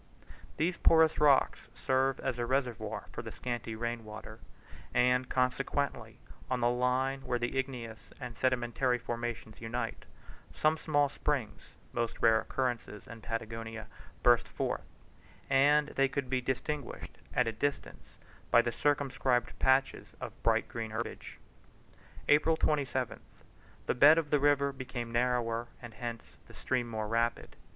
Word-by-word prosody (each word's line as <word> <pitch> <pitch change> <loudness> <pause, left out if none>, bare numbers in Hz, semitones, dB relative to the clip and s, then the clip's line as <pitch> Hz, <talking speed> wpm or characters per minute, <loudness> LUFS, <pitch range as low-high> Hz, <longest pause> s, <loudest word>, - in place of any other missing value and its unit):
These 170 +3 0
porous 160 -1 +5
rocks 145 -2 +4
serve 130 0 +1
as 130 -3 -2
a 120 - 0
reservoir 130 -4 -2
for - - -5
the - - -7
scanty 120 -2 -4
rain 115 0 -3
water; 110 0 -9 0.6
and 125 +1 +3
consequently 135 +2 -1 0.3
on 125 - 0
the 120 0 +3
line 130 +2 +1
where 125 - -1
the 120 +2 -2
igneous 125 -5 -4
and 125 -3 -6
sedimentary 125 0 +1
formations 120 -2 -5
unite, 120 +2 -4 0.5
some 155 +1 +3
small 145 -2 +2
springs 135 -6 -3 0.2
(most 120 -1 -2
rare 110 0 +5
occurrences 120 -4 -3
in 115 0 -10
Patagonia) 115 0 -5 0.4
burst 120 -1 +5
forth; - - -2 0.7
and 145 +2 +5
they 135 0 +2
could 135 -1 -4
be 130 -1 +1
distinguished 130 +2 -4 0.2
at 125 - +4
a 115 - 0
distance 140 +6 -4 0.3
by 120 - +6
the 120 - -1
circumscribed 135 -2 0
patches 130 0 +2
of - - -8
bright - - +2
green 115 -1 -5
herbage. 110 +2 -5 0.9
April 155 +2 +4
27th. 130 -8 0 0.7
The - - +1
bed 145 +5 +7
of 155 -3 -1
the 150 - +4
river 140 0 +3
became 130 -3 -5
rather 120 0 +1
narrower 120 -1 -1
and 120 -2 -10
hence 115 +1 -5 0.2
the - - -14
stream 125 -2 -1
more 110 -1 -3
rapid. 115 +2 -1
125 Hz, 145 wpm, -31 LUFS, 115-135 Hz, 0.9 s, bed